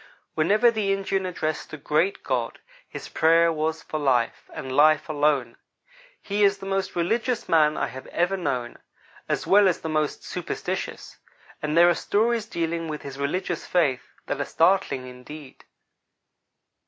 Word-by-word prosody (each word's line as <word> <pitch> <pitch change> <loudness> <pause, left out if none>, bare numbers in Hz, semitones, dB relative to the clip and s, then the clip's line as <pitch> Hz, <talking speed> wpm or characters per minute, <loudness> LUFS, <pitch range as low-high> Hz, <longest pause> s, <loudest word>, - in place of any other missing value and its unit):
Whenever 210 +9 +3
the 215 -3 -1
Indian 195 -1 -1
addressed 155 -3 -3
the 155 - -7
Great 155 +7 0
God, 125 -3 -2 0.3
his - - -8
prayer 165 +1 +3
was 160 +1 -2
for 155 - -4
life, 125 -5 0
and 130 -1 -6
life 155 +1 +5
alone. 145 -6 0 0.6
He 205 +1 -1
is 200 0 +4
the - - -10
most 195 0 -2
religious 230 +8 0
man 155 -2 +3
I - - 0
have 130 - -9
ever 175 +3 0
known, 135 -9 -3 0.5
as - - -1
well 200 0 +5
as 180 - 0
the 160 - -4
most 155 -1 -1
superstitious; - - -5 0.4
and 150 +1 -1
there 170 +1 +8
are 175 - +5
stories 220 +5 0
dealing 165 -3 -2
with 150 -1 -5
his 140 0 -8
religious 145 +7 -2
faith 145 -8 +1 0.2
that - - -3
are - - -1
startling, 165 -7 +2
indeed. 130 +3 -11
160 Hz, 155 wpm, -25 LUFS, 145-195 Hz, 0.6 s, there